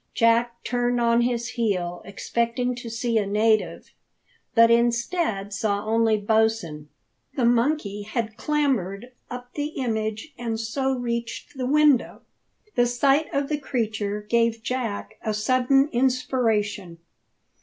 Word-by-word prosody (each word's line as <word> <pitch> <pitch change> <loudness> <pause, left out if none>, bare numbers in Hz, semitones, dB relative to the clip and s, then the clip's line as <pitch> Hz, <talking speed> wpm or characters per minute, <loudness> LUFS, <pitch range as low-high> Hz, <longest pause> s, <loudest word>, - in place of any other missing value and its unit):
Jack 235 +1 +2
turned 245 0 0
on 235 0 +3
his 240 -1 -1
heel 180 -7 -2
expecting 235 +5 -1
to 240 -1 -7
see 230 0 0
a 205 - -2
native, 215 +2 +1 0.6
but 230 0 +7
instead 235 - +1
saw 205 0 -1
only 225 0 +2
Bosin. 210 -8 0 0.5
The 255 - +1
monkey 235 -3 +1
had 220 +1 -3
clambered 250 -7 -1 0.2
up 245 0 -8
the 290 0 -2
image, 220 +2 -2
and 230 -2 -3
so 265 +4 -1
reached 235 +3 -4
the 255 -2 -2
window. 295 -2 +3 0.5
The 245 0 +3
sight 275 +5 +2
of 280 0 0
the 295 0 -2
creature 215 -6 -2
gave 230 0 +1
Jack 230 -4 -3
a 215 -1 -2
sudden 255 +5 +3
inspiration. 225 -7 0
235 Hz, 125 wpm, -24 LUFS, 215-250 Hz, 0.6 s, but